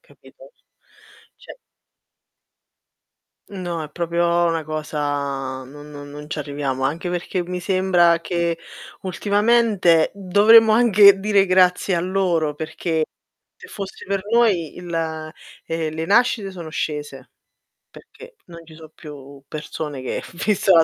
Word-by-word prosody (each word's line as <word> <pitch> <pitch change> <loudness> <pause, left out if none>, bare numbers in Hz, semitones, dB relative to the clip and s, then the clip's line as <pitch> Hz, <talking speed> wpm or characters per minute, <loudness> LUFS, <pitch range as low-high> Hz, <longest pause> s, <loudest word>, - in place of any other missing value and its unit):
capito? - - -19 0.8
Cioè - - -13 1.9
No, 175 -4 -5
è 150 - -8
proprio 170 +1 0
'na 165 -1 -1
cosa 145 -3 -3
non 145 +3 -13
non 145 -1 -10
non 150 +1 -10
ci - - -4
arriviamo, 140 -2 -3
anche 165 +6 -2
perché 175 +1 -2
mi 180 +1 -5
sembra 180 -2 +2
che, 170 -1 -2 0.4
ultimamente, 205 -3 +2
dovremmo 205 +4 +5
anche 210 -3 +6
dire 200 -1 +2
grazie 185 0 +3
a - - 0
loro, 175 -4 0
perché 160 +1 -3 0.5
se - - -13
fossi 195 -1 -8
per 195 0 -1
noi, 205 -10 +2
il 175 -1 -7 0.7
ehm, 165 -1 -3
le 160 +1 -3
nascite 205 0 +2
sono 170 -4 -8
scese, 145 -4 -5 0.6
perché, 475 0 -15
non 170 -1 -13
ci 160 - -15
so' 160 0 -13
più 140 -3 -12
persone 150 -2 -6
che 130 - -4 0.2
vista 205 -2 +2
la 165 -1 +7
170 Hz, 125 wpm, -21 LUFS, 150-195 Hz, 1.9 s, la